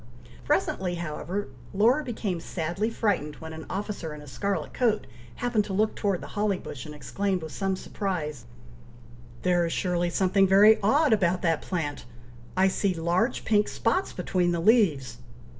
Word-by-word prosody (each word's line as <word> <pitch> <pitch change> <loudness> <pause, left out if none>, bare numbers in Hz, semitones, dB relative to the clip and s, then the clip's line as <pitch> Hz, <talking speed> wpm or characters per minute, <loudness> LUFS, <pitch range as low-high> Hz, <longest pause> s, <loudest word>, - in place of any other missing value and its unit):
Presently, 180 -2 0
however, 175 +3 -4 0.3
Laura 240 +9 +4
became 215 -8 -3
sadly 175 +6 -2
frightened 200 -10 -1
when 160 +1 -9
an 160 0 -8
officer 195 -5 -4
in 150 - -10
a - - -12
scarlet 190 +3 -3
coat 230 -4 +1 0.3
happened 240 -3 +1
to 195 - -5
look 215 +3 +1
towards 200 -4 0
the - - -8
holly 205 -2 0
bush, 135 -7 -8
and 150 - -8
exclaimed, 190 +4 -2
with 160 - -6
some 195 -1 -1
surprise, 175 - -4 1.0
"There 175 -1 +3
is 165 - -1
surely 175 -1 0
something 190 +2 +3
very 205 +3 +7
odd 280 +6 +4
about 185 -3 +1
that 165 -3 +2
plant! 160 -8 -3 0.5
I 190 +1 +5
see 190 0 0
large 175 +8 0
pink 210 -1 +3
spots 305 +12 0
between 180 -1 0
the 170 - 0
leaves!" 165 - +3
190 Hz, 160 wpm, -27 LUFS, 170-210 Hz, 1.0 s, very